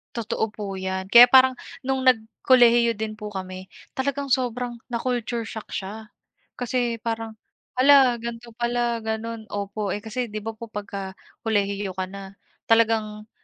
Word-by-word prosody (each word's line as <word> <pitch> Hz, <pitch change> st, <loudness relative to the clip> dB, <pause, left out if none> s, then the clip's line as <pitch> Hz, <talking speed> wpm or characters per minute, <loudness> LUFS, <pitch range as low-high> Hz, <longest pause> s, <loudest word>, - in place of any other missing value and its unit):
Totoo 225 Hz, -1 st, -2 dB
po 205 Hz, -2 st, -6 dB
yan, 190 Hz, 0 st, -3 dB
kaya 240 Hz, +5 st, +9 dB
parang 260 Hz, 0 st, +7 dB, 0.3 s
nung 265 Hz, 0 st, 0 dB
nag 255 Hz, -2 st, +5 dB, 0.2 s
kolehiyo 235 Hz, -3 st, +5 dB
din 215 Hz, 0 st, -3 dB
po 210 Hz, -1 st, -7 dB
kami 185 Hz, -1 st, -7 dB, 0.2 s
talagang 280 Hz, +1 st, -2 dB
sobrang 250 Hz, -2 st, -1 dB, 0.2 s
na-culture 240 Hz, -1 st, -2 dB
shock 220 Hz, 0 st, -8 dB
siya. 215 Hz, +3 st, -6 dB, 0.5 s
Kasi 245 Hz, -1 st, -1 dB
parang, 225 Hz, -1 st, -4 dB, 0.4 s
"hala 265 Hz, -2 st, +6 dB
gan'to 235 Hz, 0 st, -7 dB
pala 240 Hz, 0 st, 0 dB
gano'n," 220 Hz, 0 st, -4 dB
opo, 205 Hz, 0 st, -3 dB
eh, 205 Hz, -, -4 dB
kasi 225 Hz, +3 st, -3 dB
'di 215 Hz, -2 st, -6 dB
ba 220 Hz, +1 st, -6 dB
po 230 Hz, -, -7 dB
pagka 200 Hz, -3 st, -6 dB, 0.3 s
kolehiyo 200 Hz, -3 st, 0 dB
ka 185 Hz, 0 st, -4 dB
na 195 Hz, 0 st, -9 dB, 0.3 s
talagang, 220 Hz, -2 st, +1 dB
225 Hz, 145 wpm, -24 LUFS, 205-240 Hz, 0.5 s, kaya